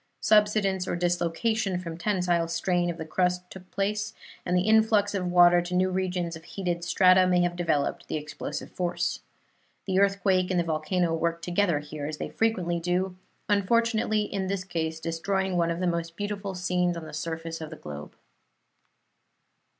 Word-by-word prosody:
Subsidence 210 -3 +3
or - - -1
dislocation 175 +4 0
from 170 -2 -6
tensile 175 -2 0
strain 175 +1 0
of 170 - -4
the 160 - -5
crust 180 +2 0
took 185 -1 -11
place, 210 +2 -2 0.3
and 180 +1 +2
the 180 - +2
influx 215 -1 +3
of 185 -2 -1
water 175 0 +6
to 175 +1 -4
new 185 +1 +2
regions 180 -2 -1
of 160 - -11
heated 175 -1 -3
strata 185 +1 +5
may 180 -1 +3
have 175 0 0
developed 160 -5 -1
the - - -2
explosive 150 0 -6
force. 175 -1 -1 0.7
The 190 -1 +1
earthquake 195 -2 +2
and 185 -2 +1
the - - +2
volcano 165 +2 0
worked 170 +1 -1
together 175 -2 +1
here, 150 0 -6
as 155 0 -5
they - - -4
frequently 185 -7 0
do, 180 +2 -1 0.3
unfortunately 215 +1 +2
in 195 -2 -3
this 195 -1 -2
case 160 -3 -3
destroying 185 +4 -1
one 170 -1 +2
of 170 0 -2
the 180 - 0
most 170 -1 -2
beautiful 205 -1 -4
scenes 180 -1 0
on 165 - -7
the - - -10
surface 165 +2 -4
of 155 - -6
the 160 - -8
globe. 75 - -9
180 Hz, 175 wpm, -27 LUFS, 170-195 Hz, 0.7 s, water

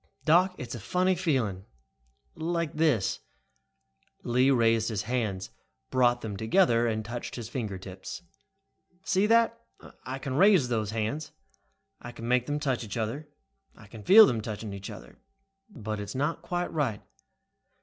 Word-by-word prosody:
"Doc, 180 +4 +4
it's 120 -2 -6
a 120 - -5
funny 180 - +1
feeling. 130 - -1 0.7
Like 170 -1 -2
this." 150 - +1 1.0
Lee 125 +3 +3
raised 115 -3 +3
his 105 -3 -2
hands, 105 - -2 0.4
brought 120 -1 +3
them 105 -3 -5
together 120 - +3
and 110 -1 -2
touched 120 +3 -6
his 120 -2 -6
fingertips. 100 - -6 0.8
"See 195 +2 +2
that? 230 +1 +3 0.4
I 130 +1 -5
can 135 0 -5
raise 185 -8 +5
those 110 -4 -1
hands. 115 +7 -3 0.7
I 120 - -8
can 115 -1 -8
make 125 0 +2
them 145 0 -1
touch 135 -5 -1
each 105 -1 -6
other. 120 +7 -3 0.5
I - - -15
can 105 +2 -11
feel 215 - +9
them 120 - 0
touching 105 -1 -6
each 100 +1 -7
other. 105 - -12 0.5
But 110 - -5
it 105 - -4
is - - -11
just - - -7
not 150 +5 -1
quite 175 +1 -3
right. 135 -10 -1
120 Hz, 155 wpm, -28 LUFS, 110-160 Hz, 1.0 s, feel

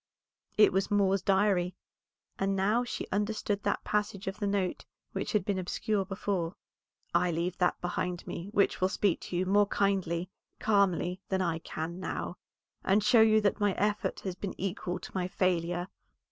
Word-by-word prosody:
It 210 - +6
was 190 +1 +1
Moor's 195 -2 +3
Diary, 190 -2 +2 0.6
and 195 0 +1
now 210 +5 +2
she 245 - -4
understood 205 0 -1
that - - -1
passage 210 -1 -1
of 195 +2 -4
the 205 - 0
note 200 -2 -1 0.3
which - - -3
had 210 -4 +2
been 200 -2 0
obscure 195 +2 -1
before. 190 -3 -2 0.6
"I 175 +1 +3
leave 170 +2 -2
that 180 -1 +2
behind 175 0 -2
me 175 +4 -6
which 200 -3 +2
will 185 - +3
speak 200 -2 +1
to - - -6
you 185 - +1
more 205 +2 +4
kindly, 185 -3 0 0.3
calmly, 195 -3 +2
than 190 -1 +1
I 165 -2 0
can 165 +2 -5
now, - - -4 0.5
and 195 +2 +3
show 220 +2 +6
you 220 -1 +6
that 205 +1 +1
my 205 -2 +2
effort 210 +2 -1
has 190 - -3
been 185 +1 -6
equal 180 -1 -2
to - - -10
my 180 -1 -1
failure." 175 -1 0
190 Hz, 175 wpm, -30 LUFS, 180-205 Hz, 0.6 s, It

